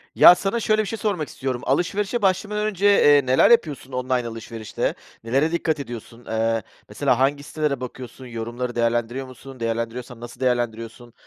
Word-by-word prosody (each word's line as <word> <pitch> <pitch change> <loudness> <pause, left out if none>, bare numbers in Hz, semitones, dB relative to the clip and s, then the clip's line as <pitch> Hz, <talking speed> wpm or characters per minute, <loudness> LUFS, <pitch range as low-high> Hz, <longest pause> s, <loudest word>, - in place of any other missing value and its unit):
Ya, 180 - +9
sana 195 +5 -1
şöyle 215 -1 +2
bir 215 - -4
şey 225 +3 -4
sormak 195 -8 -1
istiyorum: 130 -2 -4
Alışverişe 195 - 0
başlamadan 210 +2 +1
önce, 200 -2 -1
eee, 145 -9 +6
neler 130 +1 +5
yapıyorsun 150 - +2
online 125 -1 -1
alışverişte? 115 -1 -4 0.3
Nelere 135 +7 +1
dikkat 160 -2 0
ediyorsun? 120 -2 -9
Eee, 115 0 0 0.3
mesela 125 - +1
hangi 140 +2 +1
sitelere 150 -2 -2
bakıyorsun, 130 +1 -8
yorumları 120 +1 -5
değerlendiriyor 120 +2 0
musun, 130 0 -12
değerlendiriyorsan 115 +1 -4
nasıl 120 +1 -10
değerlendiriyorsun? 120 -1 -2
130 Hz, 155 wpm, -23 LUFS, 120-160 Hz, 0.3 s, Ya